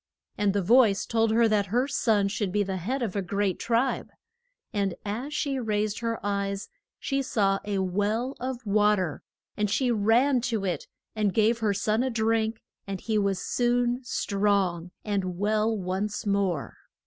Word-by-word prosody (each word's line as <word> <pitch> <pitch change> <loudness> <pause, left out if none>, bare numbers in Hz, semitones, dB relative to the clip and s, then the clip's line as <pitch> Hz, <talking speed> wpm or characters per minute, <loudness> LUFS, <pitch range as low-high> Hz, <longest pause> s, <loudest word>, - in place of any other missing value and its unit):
And 205 -1 +1
the 200 -1 0
voice 220 -1 +4
told 225 -1 +1
her 230 +1 +4
that 210 -2 +1
her 245 +7 +1
son 220 -7 +2
should 200 -1 -2
be 205 +1 +2
the 190 -1 -3
head 245 +9 -2
of 210 -5 -3
a 200 - +1
great 200 +1 -1
tribe. 235 +3 0 0.6
And 200 -3 0
as 235 +8 -3
she 285 -3 -1
raised 215 -2 -1
her 230 -1 -2
eyes 200 0 -2 0.3
she 275 0 -1
saw 200 -6 +1
a 205 -1 -1
well 205 +7 0
of 255 -1 -4
wa 210 +1 +4
ter, 180 -6 -3 0.3
and 210 -1 0
she 245 +4 +1
ran 235 +5 +3
to 220 -4 -1
it 180 - -2 0.3
and 210 -3 0
gave 225 +1 +3
her 210 -3 +1
son 215 +3 +1
a 260 - 0
drink 225 -1 0 0.2
and 195 -1 -4
he 220 +1 0
was 200 -2 0
soon 245 0 +1
strong 195 -6 0 0.2
and 190 -4 -2
well 215 +2 +1
once 195 +4 -3
more. 195 -7 -1
210 Hz, 170 wpm, -27 LUFS, 200-230 Hz, 0.6 s, voice